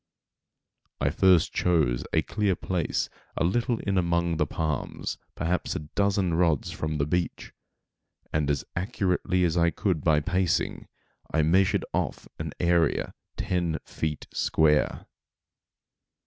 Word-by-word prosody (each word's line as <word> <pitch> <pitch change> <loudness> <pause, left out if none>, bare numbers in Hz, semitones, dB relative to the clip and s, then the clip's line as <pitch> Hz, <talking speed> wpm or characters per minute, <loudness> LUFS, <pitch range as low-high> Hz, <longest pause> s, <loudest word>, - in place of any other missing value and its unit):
I 70 +1 +1
first 90 -1 +4
chose 75 -9 +2
a - - +2
clear 105 -3 0
place 90 -3 -1 0.3
a - - +2
little 120 +7 +1
in 100 -2 +1
among 85 -1 +1
the - - +1
palms, 80 -4 -3 0.2
perhaps 85 +2 -1
a - - -1
dozen 100 -3 +1
rods 80 -4 +2
from 80 0 -3
the 70 - +1
beach, 85 +3 -2 0.8
and, 75 -2 +1
as 70 - 0
accurately 90 -2 0
as 85 -2 +2
I 85 0 +4
could 85 -5 -1
by 80 -2 +4
pacing, 90 +2 0 0.4
I 80 - +2
measured 90 +4 +3
off - - -2
an - - -3
area 85 -1 +2 0.2
ten 85 -3 0
feet 75 -2 -3
square. 75 -1 +2
85 Hz, 130 wpm, -27 LUFS, 80-90 Hz, 0.8 s, first